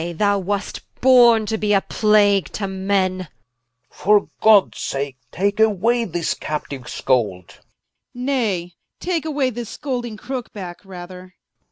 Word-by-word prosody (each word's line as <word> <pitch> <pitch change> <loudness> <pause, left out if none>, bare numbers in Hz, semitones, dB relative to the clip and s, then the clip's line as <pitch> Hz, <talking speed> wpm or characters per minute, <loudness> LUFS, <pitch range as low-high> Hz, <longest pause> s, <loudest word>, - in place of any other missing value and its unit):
I, 170 +1 -4
thou 200 +3 +1
wast 200 +2 -3 0.2
borne 240 -4 +6
to 220 0 -2
be 210 -1 +1
a 195 - +4
plague 205 -3 +3
to 200 - -3
men 190 -1 0
Rich. 185 - -7 0.6
For 205 +1 +2
Gods 215 -3 +5
sake, 135 -1 -3
take 200 +3 -1
away 220 +3 +2
this 175 -3 -2
Captiue 140 -4 -6
Scold 100 -9 -1
Prince. - - -18 0.5
Nay, 230 -10 -1 0.3
take 345 -3 -2
away 285 -4 0
this 235 -1 -6
scolding 245 -5 -4
Crooke 250 +1 -6
backe, 180 -3 -8
rather 180 -1 -9
Edw. 185 0 -16
200 Hz, 150 wpm, -21 LUFS, 180-230 Hz, 0.6 s, borne